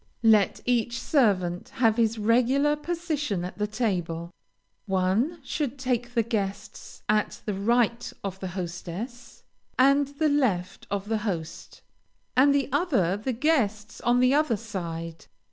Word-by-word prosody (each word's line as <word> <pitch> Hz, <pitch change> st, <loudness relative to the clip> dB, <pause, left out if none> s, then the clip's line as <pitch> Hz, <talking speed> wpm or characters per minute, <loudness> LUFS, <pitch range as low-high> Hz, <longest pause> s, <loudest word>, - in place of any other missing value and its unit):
Let 215 Hz, -3 st, +4 dB
each 235 Hz, -1 st, +1 dB
servant 185 Hz, -, +1 dB
have 225 Hz, -2 st, +3 dB
his 230 Hz, -1 st, +2 dB
regular 250 Hz, +7 st, +3 dB
position 300 Hz, -, -2 dB
at 180 Hz, +2 st, -8 dB
the 210 Hz, -, 0 dB
table. 175 Hz, -7 st, -2 dB, 0.6 s
One 195 Hz, -, +1 dB
should 275 Hz, 0 st, -3 dB
take 245 Hz, -2 st, -2 dB
the 230 Hz, -, +3 dB
guests 205 Hz, -2 st, -4 dB
at 210 Hz, 0 st, +1 dB
the 210 Hz, -, -1 dB
right 235 Hz, +3 st, +1 dB
of 195 Hz, -1 st, -4 dB
the 190 Hz, -, -4 dB
hostess, 185 Hz, +7 st, -6 dB, 0.3 s
and 275 Hz, +2 st, +5 dB
the 285 Hz, +3 st, -1 dB
left 245 Hz, -12 st, 0 dB
of 200 Hz, 0 st, -3 dB
the 220 Hz, 0 st, 0 dB
host; 180 Hz, -7 st, -5 dB, 0.5 s
the 280 Hz, +1 st, +4 dB
other 260 Hz, -, +2 dB
the 215 Hz, +6 st, -3 dB
guests 225 Hz, -6 st, 0 dB
on 245 Hz, +1 st, +3 dB
the 255 Hz, +1 st, +4 dB
other 290 Hz, -6 st, +2 dB
side. 165 Hz, -6 st, -6 dB
225 Hz, 135 wpm, -26 LUFS, 195-260 Hz, 0.6 s, and